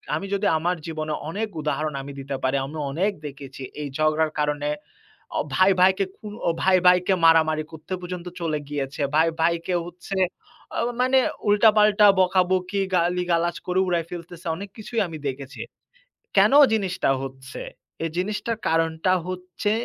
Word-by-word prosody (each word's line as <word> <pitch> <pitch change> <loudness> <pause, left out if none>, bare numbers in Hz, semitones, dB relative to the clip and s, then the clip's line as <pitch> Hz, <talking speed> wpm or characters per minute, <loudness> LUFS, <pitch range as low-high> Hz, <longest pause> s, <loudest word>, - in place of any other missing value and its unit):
আমি 195 - -3
যদি 200 +1 0
আমার 175 +3 0
জীবনের 155 -2 -3
অনেক 215 +5 -2
উদাহরণ 150 0 -1
আমি 140 +1 -8
দিতে 135 0 -4
পারি, 130 +1 +1
আমি 155 +3 -7
অনেক 190 +8 +1
দেখেছি 140 -1 -9 0.2
এই 145 - -3
ঝগড়ার 155 0 +2
কারণে 150 0 0 0.7
অ - - +2
ভাই, 185 +1 +5
ভাইকে 190 +1 +4
খু - - -13 0.4
ভাই, 190 0 +5
ভাইকে 180 +1 +5
মারামারি 160 -1 +4
করতে 160 +4 -6
পর্যন্ত 180 0 -6
চলে 160 -3 -1
গিয়েছে। 140 0 -3
ভাই, 160 +1 +4
ভাইকে 170 +2 +1
হচ্ছে, 180 +3 -7 0.6
অ - - -1 0.2
মানে 260 +1 +4 0.3
উল্টাপাল্টা 210 0 +5
বকাবকি, 185 +1 +2
গালিগালাজ 175 -1 +1
করে 180 +1 +1
উড়ায়ে 170 -2 0
ফেলতেছে। 175 0 -9
অনেক 200 +3 -7
কিছুই 225 +1 -3
আমি 160 -2 -7
দেখেছি। 135 +1 -7 0.8
কেন - - +6 0.2
জিনিসটা 190 -7 0
হচ্ছে? 130 0 -8 0.4
এই 165 - -1
জিনিসটার 210 +4 -2
কারণটা 165 +2 +1
হচ্ছে, 185 +3 -3
175 Hz, 145 wpm, -24 LUFS, 155-185 Hz, 0.8 s, কেন